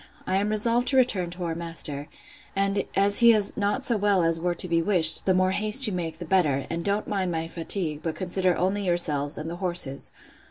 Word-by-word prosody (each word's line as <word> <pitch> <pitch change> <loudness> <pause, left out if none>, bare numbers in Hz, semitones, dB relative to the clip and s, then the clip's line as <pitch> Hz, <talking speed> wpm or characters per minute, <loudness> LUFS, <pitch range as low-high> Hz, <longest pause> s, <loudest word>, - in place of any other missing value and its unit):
I 190 - -1
am 205 +2 -1
resolved 230 +3 +2
to 270 - +2
return 205 -9 +1
to 180 +1 -8
our 165 -1 -3
master; 165 -4 -5 0.5
and 195 0 -1
as 200 +1 +3
he 235 -1 +6
is 210 -2 0
not 210 +7 -2
so 235 -4 +2
well 200 -3 +1
as 165 0 +1
were 175 +1 -2
to 180 - +1
be 165 -1 0
wished, 165 -3 +5
the 190 - +3
more 185 0 +1
haste 215 +6 0
you 210 - -2
make 165 -3 -5
the 175 - -8
better: 155 -7 0
and 170 +1 -4
don't 200 +3 -1
mind 190 -3 -2
my 165 0 -4
fatigue, 165 -2 -2
but 165 -2 -4
consider 185 -1 -1
only 190 +3 -1
yourselves, 155 -5 0
and 155 - -6
the 170 +1 -6
horses. 175 -7 +1
180 Hz, 225 wpm, -24 LUFS, 165-205 Hz, 0.5 s, he